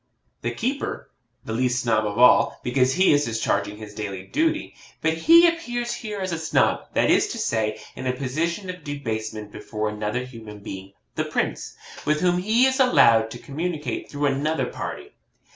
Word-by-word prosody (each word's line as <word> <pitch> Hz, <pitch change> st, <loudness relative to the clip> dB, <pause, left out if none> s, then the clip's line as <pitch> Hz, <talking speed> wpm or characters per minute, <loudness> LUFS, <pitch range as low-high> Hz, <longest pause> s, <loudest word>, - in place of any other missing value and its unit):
1. -, -, -1 dB
The -, -, -9 dB
keeper 265 Hz, +5 st, -3 dB, 0.3 s
the 110 Hz, -, -4 dB
least 125 Hz, +1 st, +1 dB
Snob 110 Hz, -2 st, +2 dB
of 105 Hz, +1 st, -4 dB
all, 125 Hz, +1 st, +5 dB
because 130 Hz, +1 st, +2 dB
he 185 Hz, -2 st, +4 dB
is 145 Hz, 0 st, +3 dB
discharging 105 Hz, -2 st, -1 dB
his 105 Hz, -1 st, -10 dB
daily 100 Hz, -3 st, -5 dB
duty; 320 Hz, -, -1 dB, 0.3 s
but 160 Hz, 0 st, +1 dB
he 330 Hz, -, +7 dB
appears 240 Hz, -8 st, -2 dB
here 215 Hz, -4 st, -5 dB
as 185 Hz, -1 st, -2 dB
a 165 Hz, -, -2 dB
Snob, 160 Hz, -, +1 dB
that -, -, +3 dB
is -, -, +4 dB
to -, -, -5 dB
say, 110 Hz, -1 st, -1 dB, 0.2 s
in 130 Hz, -, -5 dB
a -, -, +2 dB
position 165 Hz, +9 st, -2 dB
of 180 Hz, -3 st, -12 dB
debasement 110 Hz, -7 st, -4 dB
before 110 Hz, 0 st, -4 dB
another 105 Hz, +3 st, -2 dB
human 115 Hz, -4 st, -10 dB
being 95 Hz, -1 st, -8 dB, 0.2 s
(the -, -, -1 dB
Prince), -, -, -2 dB, 0.3 s
with 150 Hz, +1 st, +1 dB
whom 180 Hz, -1 st, +2 dB
he 220 Hz, +7 st, +3 dB
is 265 Hz, +1 st, +1 dB
allowed 115 Hz, -, +5 dB
to 120 Hz, -, -7 dB
communicate 155 Hz, +4 st, -4 dB
through 145 Hz, 0 st, -2 dB
another 145 Hz, +3 st, 0 dB
party. -, -, -6 dB
135 Hz, 180 wpm, -24 LUFS, 110-180 Hz, 0.3 s, he